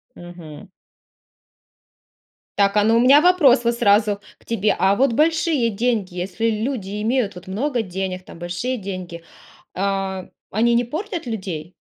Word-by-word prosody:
Мгм. 175 +1 -11 1.9
Так, 200 0 +3
а, 205 - +4
ну, 225 +2 +3
у - - +4
меня 275 +5 +6
вопрос 300 -9 +5
вот 235 0 +1
сразу 205 -2 +3 0.2
к - - -27
тебе. 215 -2 0
А 195 +1 +3
вот 260 0 +2
большие 310 -3 +2
деньги, 215 -4 -1
если 185 +5 -2
люди 215 -3 -3
имеют 225 -3 0
вот 180 +2 -12
много 245 +6 -1
денег, 185 -2 -5
там - - -13
большие 180 +9 -3
деньги, 185 -4 -7 0.5
а, 195 -1 -2 0.2
они 235 +3 +2
не 240 - +3
портят 335 - -5
людей? 185 -8 -5
210 Hz, 145 wpm, -21 LUFS, 190-245 Hz, 1.9 s, меня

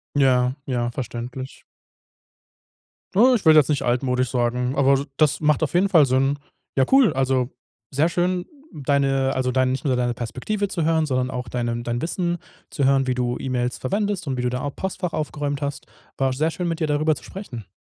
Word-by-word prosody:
Ja, 125 -3 +3
ja, 120 -2 -1
verständlich. 125 +2 -6 1.5
Na, 245 +6 +6
ich 215 - -1
würde 155 -1 +8
jetzt 145 - +4
nicht 145 - +1
altmodisch 125 +1 0
sagen, 125 +1 0
aber 140 0 +4
d 140 - -2
das 150 -2 +2
macht 150 -1 +2
auf 150 - 0
jeden 190 +3 +3
Fall 165 -7 +6
Sinn. 135 +2 +1 0.4
Ja 135 - +4
cool, 265 -5 +6
also, 130 -1 +1 0.4
sehr 150 +5 +2
schön 180 +1 0 0.3
deine 135 -1 +1
also, 130 -1 0
dein 130 0 +2
nicht 135 +2 -4
nur 130 -2 +2
deine 120 -1 0
Perspektive 130 - -3
zu 170 -4 -2
hören, 160 -1 +2
sondern 130 -2 0
auch 125 -1 -5
dein 120 -1 -2
ähm, 120 0 -3
dein 120 0 -2
Wissen 175 +1 -1 0.3
zu 140 - -1
hören, 135 0 +3
wie 130 - +1
du 125 -1 -1
E-Mails 125 -1 -2
verwendest 200 +5 -2
und 130 -2 -2
wie 125 - -2
du 125 - 0
da 125 +1 -3
a 145 - -2
Postfach 180 +2 -4
aufgeräumt 145 -1 -3
hast, 140 0 -4 0.3
war 135 -1 +1
sehr 155 +4 +1
schön 175 +1 -3
mit 165 0 -3
dir 155 - +1
darüber 150 +1 +2
zu - - -12
sprechen. 120 - -8
135 Hz, 200 wpm, -23 LUFS, 125-155 Hz, 1.5 s, würde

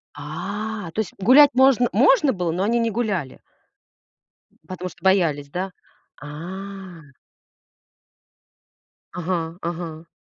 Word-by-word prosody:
А, 200 +6 -5
то - - -4
есть 215 - -2
гулять 275 +8 +7
можн 260 -1 +5
можно 360 - +4
было, 175 -3 -2
но 180 +3 -1
они 235 +3 +1
не 230 0 +1
гуляли. 200 - -2 1.3
Потому 185 0 -6
что 170 - -19
боялись, 165 -7 +2
да? 185 +4 -4 0.5
А. 185 +4 -8 2.1
Ага, 170 -1 -3
ага. 165 -1 -6
185 Hz, 105 wpm, -22 LUFS, 165-220 Hz, 2.1 s, гулять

